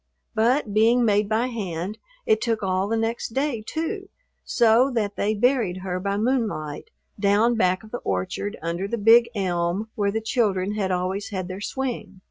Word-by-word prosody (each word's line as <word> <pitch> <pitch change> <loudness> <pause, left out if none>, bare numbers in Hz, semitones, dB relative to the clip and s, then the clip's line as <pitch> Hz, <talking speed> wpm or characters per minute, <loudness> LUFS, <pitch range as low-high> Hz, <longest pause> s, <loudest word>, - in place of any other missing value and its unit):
But, 230 0 +1
being 230 +3 +4
made 210 -1 +2
by 220 +3 +2
hand, 200 -5 -4 0.3
it 440 -3 +3
took 225 -2 -1
all 190 0 0
the 225 +2 0
next 225 0 -2
day, 270 -4 0
too, 375 - -4 0.3
so 235 +3 +4
that 205 -3 -1
they 215 +2 0
buried 225 -5 +2
her 180 -1 -2
by 200 +1 -1
moonlight 215 - -1 0.3
down 205 +4 +3
back 185 -3 +1
of 215 - -14
the 245 - -4
orchard 95 - -3
under 170 +4 -2
the 235 - -2
big 230 +2 +6
elm 180 +2 -1
where 200 -1 0
the 220 - -1
children 205 -4 0
had 200 -3 -1
always 185 +2 -2
had 185 -3 -4
their 185 +2 -6
swing. 215 -6 -4
215 Hz, 175 wpm, -24 LUFS, 190-235 Hz, 0.3 s, big